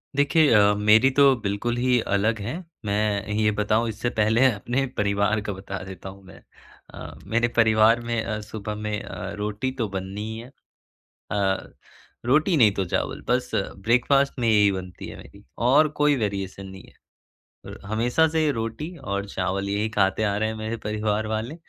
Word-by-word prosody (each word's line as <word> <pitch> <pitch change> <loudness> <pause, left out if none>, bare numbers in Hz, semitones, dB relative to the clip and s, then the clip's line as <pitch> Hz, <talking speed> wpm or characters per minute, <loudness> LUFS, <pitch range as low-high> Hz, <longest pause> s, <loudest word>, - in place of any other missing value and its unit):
देखिए 145 +2 +4
अ, 105 -1 +5
मेरी 105 +5 +5
तो 140 -2 +6
बिल्कुल 105 +3 -2
ही 125 0 +2
अलग 105 +2 0
है, 110 +6 -4 0.3
मैं 105 -1 0
ये 105 0 +2
बताऊँ 110 +2 +1
इससे 110 +3 -2
पहले 110 +3 +2
अपने 120 +5 -2
परिवार 100 +1 +1
का 105 0 -4
बता 95 +1 -7
देता 95 0 -9
हूँ 95 +1 -13
मैं। 95 - -15 0.5
अ, - - -9
मेरे 115 +4 +1
परिवार 110 +1 +5
में 120 -1 -2
अ, 110 -2 -3
सुबह 105 0 -6
में 105 0 -3
अ, 95 +1 -6
रोटी 105 +5 -3
तो 115 - 0
बननी 95 +1 -5
ही 110 - -6
है, 115 - -9 0.8
अ, 95 -2 -1 0.5
रोटी 155 +8 +3
नहीं 110 -6 +6
तो 95 - -1
चावल, 85 - -2
बस - - 0
ब्रेकफास्ट 125 +7 +1
में 115 -2 +1
यही 105 -2 +4
बनती 90 -2 -7
है - - -9
मेरी - - -15 0.2
और 150 +4 +5
कोई 150 -1 +4
वेरिएशन 100 -4 -3
नहीं 95 -1 -11
है। - - -19 0.8
अ, - - -13
हमेशा 120 +9 +2
से 160 -1 +1
रोटी 115 +9 -5
और 100 -8 -4
चावल 95 +1 -2
यही 105 +2 -1
खाते 100 -1 +1
आ 100 -2 +1
रहे 110 +1 0
हैं 110 - -4
मेरे 110 +1 -4
परिवार 105 0 -1
वाले। 110 +6 -3
110 Hz, 175 wpm, -24 LUFS, 100-120 Hz, 0.8 s, तो